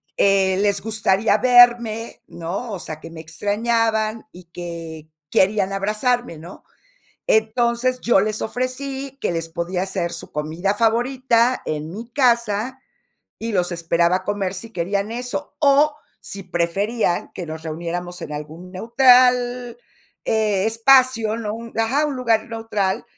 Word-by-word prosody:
eh, 190 -1 +3
les 200 -1 +2
gustaría 215 -1 +1
verme, 240 -2 +4
¿no? 190 +8 -5
O 190 - -4
sea, 155 -1 -7
que 165 - -9
me 165 -1 -10
extrañaban 215 +6 -1
y 180 0 -14
que 165 -2 -8 0.2
querían 195 0 +2
abrazarme, 215 - -1
¿no? 170 +4 -12 0.7
Entonces, 235 +3 +1
yo 240 -4 +3
les 215 +1 -1
ofrecí 265 +3 -4
que - - 0
les 165 -1 -3
podía 175 +2 -2
hacer, 185 -3 -2
su 170 - -8
comida 160 +7 -2
favorita 240 +2 +2
en 155 +2 -4
mi 230 +4 -8
casa, 235 -1 +1 0.6
y 230 0 -4
los 180 -2 +1
esperaba 170 +1 +1
a 185 - -6
comer 200 -2 -2
si 225 +5 -8
querían 200 +4 -2
eso, 250 +4 -5
o 290 +1 +4 0.3
si 195 0 -7
preferían, 180 +3 -1
que 180 - -5
nos 160 0 -7
reuniéramos 175 +2 -5
en 150 - -6
algún 160 +5 -8
neutral, 245 +2 +3 0.5
eh 210 -3 +1
espacio, 230 -1 +4
¿no? 215 -2 -4
Un 230 0 -8
ajá. 270 +7 +2
Un 280 -3 -3
lugar 230 -3 +1
neutral, 225 -4 -2
215 Hz, 140 wpm, -21 LUFS, 180-240 Hz, 0.7 s, verme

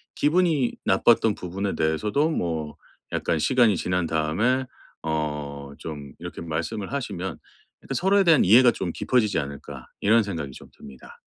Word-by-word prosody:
기분이 155 -4 +2
나빴던 115 -3 +3
부분에 95 +3 -4
대해서도 105 - +1
뭐 80 - -3 0.4
약간 80 - -1
시간이 120 - +3
지난 90 0 -1
다음에 85 +13 0 0.4
어 75 -2 -3 0.2
좀 75 -4 -8
이렇게 90 +1 -7
말씀을 85 +6 -4
하시면 95 - -4 0.4
일단 - - -6
서로에 195 +2 +3
대한 165 -6 +5
이해가 120 +6 +7
좀 90 -6 -4
깊어지지 110 +1 +1
않을까 70 -2 -7
이런 110 +3 +4
생각이 80 -9 -5
좀 - - -12
듭니다. 65 -2 -14
95 Hz, 330 characters per minute, -25 LUFS, 80-125 Hz, 0.4 s, 이해가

